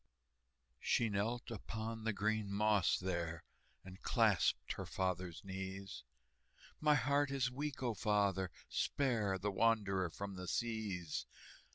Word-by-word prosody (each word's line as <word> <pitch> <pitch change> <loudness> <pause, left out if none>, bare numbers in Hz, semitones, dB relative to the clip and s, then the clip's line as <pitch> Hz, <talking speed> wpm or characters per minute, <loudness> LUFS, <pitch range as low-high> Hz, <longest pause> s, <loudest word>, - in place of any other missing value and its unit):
She 115 - +2
knelt 115 +5 -1
upon 110 +1 -4
the 115 - +2
green 105 0 0
moss 105 -2 +3
there, 85 -3 -2 0.4
And 95 0 -10
clasped - - +3
her - - -5
father's 90 -2 -2
knees: 95 -6 -5 0.8
"My 150 -1 +5
heart 140 +2 +2
is 135 -2 +1
weak, 140 +1 -3
O 120 -2 +1
father, 100 -2 +2 0.2
spare 115 -9 +1
The 100 +2 -1
wanderer 100 -4 +2
from 100 +3 -6
the 90 0 -5
seas!" 105 -9 -2
105 Hz, 125 wpm, -37 LUFS, 95-115 Hz, 0.8 s, My